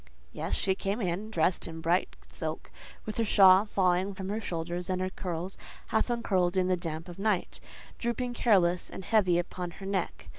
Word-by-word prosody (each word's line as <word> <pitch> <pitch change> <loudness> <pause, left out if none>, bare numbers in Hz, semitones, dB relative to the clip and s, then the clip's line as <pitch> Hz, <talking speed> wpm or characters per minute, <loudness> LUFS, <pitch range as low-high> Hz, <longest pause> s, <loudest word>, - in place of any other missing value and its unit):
Yes: - - -4
in - - +4
she 190 - +2
came, 195 0 -2
dressed 175 -2 +1
in 160 -1 -7
bright 170 +3 +1
silk, - - -5 0.3
with 215 - -5
her 230 - +2
shawl 195 -1 +7
falling 190 0 +1
from 190 0 -5
her 215 +2 -2
shoulders, 175 -1 -4
and 185 -1 0
her 185 0 -2
curls, 180 0 -5 0.3
half 220 +2 +1
uncurled 190 -7 +1
in 185 -1 +3
the 185 - +3
damp 165 -1 -5
of 175 +1 -10
night, 200 -3 0 0.4
drooping 245 +1 -2
careless 180 -7 +3
and 190 - -8
heavy 190 -6 +3
upon 175 0 -3
her 195 - -8
neck. 195 -1 -3
185 Hz, 185 wpm, -29 LUFS, 175-205 Hz, 0.4 s, shawl